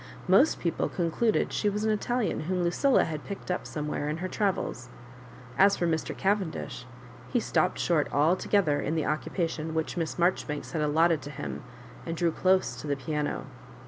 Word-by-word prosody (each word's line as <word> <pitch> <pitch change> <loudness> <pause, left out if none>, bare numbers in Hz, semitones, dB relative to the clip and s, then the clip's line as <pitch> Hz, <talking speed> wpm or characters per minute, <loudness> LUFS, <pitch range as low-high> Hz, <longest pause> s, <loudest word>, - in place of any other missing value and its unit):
Most 195 +12 +5
people 170 - -1
concluded 180 +6 0
she 210 - +1
was 210 +1 -2
3 220 - +2
an 215 - +2
Italian 240 -1 -1
whom 180 +3 -1
LuciUa 260 +10 +3
had 155 -2 -5
picked 200 -2 -6
up 180 - -2
some 150 -1 -4
where 150 0 -2
in 155 - -2
her 185 +2 -3
travels. 185 - -2 0.7
As 200 +1 +6
for 175 - 0
Mr. 160 -2 -1
Cavendish, 190 -10 -1 0.4
he 245 - +3
stopped 180 -4 +1
short 160 -4 +1
altogether 160 +1 +2
in 155 - -1
the 160 - 0
occupation 160 +2 -2
which 160 +2 -2
Miss 165 -2 -2
Maijoribanks 170 -4 0
had 160 - -1
aUotted 160 +1 +3
to 145 - -8
him, 145 - -6 0.4
and 165 0 -4
drew 170 0 +2
dose 185 +3 +2
to - - -7
the 140 - +1
piano. 150 +2 -3
170 Hz, 180 wpm, -28 LUFS, 155-190 Hz, 0.7 s, As